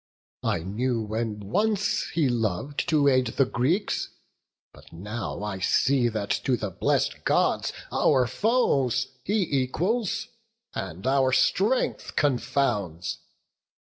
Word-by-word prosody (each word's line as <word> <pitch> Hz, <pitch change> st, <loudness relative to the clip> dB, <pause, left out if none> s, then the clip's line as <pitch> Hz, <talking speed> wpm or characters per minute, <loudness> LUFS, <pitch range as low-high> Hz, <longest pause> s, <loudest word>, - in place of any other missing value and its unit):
I 80 Hz, -, 0 dB
knew 115 Hz, +6 st, -1 dB
when 110 Hz, 0 st, -3 dB
once 205 Hz, -, 0 dB
he 160 Hz, -4 st, +1 dB
lov'd 120 Hz, +3 st, -1 dB
to 150 Hz, -3 st, +3 dB
aid 130 Hz, -2 st, +4 dB
the 135 Hz, +4 st, +2 dB
Greeks; 145 Hz, -, 0 dB, 0.6 s
But -, -, -17 dB
now 105 Hz, +3 st, -5 dB
I 100 Hz, -3 st, -4 dB
see 125 Hz, +5 st, +2 dB
that 105 Hz, -2 st, -3 dB
to 130 Hz, -2 st, +1 dB
the 105 Hz, -3 st, -4 dB
blessed -, -, 0 dB
Gods -, -, +2 dB, 0.2 s
Our 130 Hz, -4 st, +3 dB
foes 135 Hz, -, +1 dB
he 210 Hz, +1 st, +1 dB, 0.2 s
equals, 200 Hz, -, -1 dB, 0.4 s
and 90 Hz, +8 st, -6 dB
our 130 Hz, 0 st, +3 dB
strength 205 Hz, -, +1 dB
confounds. 120 Hz, -, 0 dB
130 Hz, 115 wpm, -26 LUFS, 105-150 Hz, 0.6 s, aid